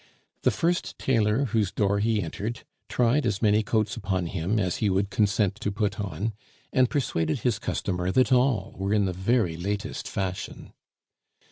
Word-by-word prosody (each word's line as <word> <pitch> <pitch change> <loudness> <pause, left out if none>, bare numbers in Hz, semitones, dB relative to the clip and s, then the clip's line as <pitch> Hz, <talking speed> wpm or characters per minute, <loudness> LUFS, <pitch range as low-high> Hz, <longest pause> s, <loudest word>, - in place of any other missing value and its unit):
The - - +4
first 175 +2 -1
tailor 115 0 +2
whose 105 -4 0
door 100 -1 +1
he 110 -1 +1
entered 105 +7 -5 0.2
tried 125 +4 +2
as 105 -4 0
many 105 -1 +4
coats 110 +1 0
upon 95 -6 -1
him 90 +5 -1
as 90 -4 0
he 105 - +1
would 95 +1 0
consent 100 -1 +2
to 105 - -1
put 105 0 -1
on, 100 +3 -2 0.4
and 130 -1 +4
persuaded 80 - 0
his 120 -4 +1
customer 90 -6 -2
that 130 +5 +3
all 125 -6 +2
were 100 +2 +1
in 105 -2 +3
the 95 - -1
very 95 -1 +1
latest 100 +4 -3
fashion. 95 -1 -4
105 Hz, 165 wpm, -26 LUFS, 95-115 Hz, 0.4 s, The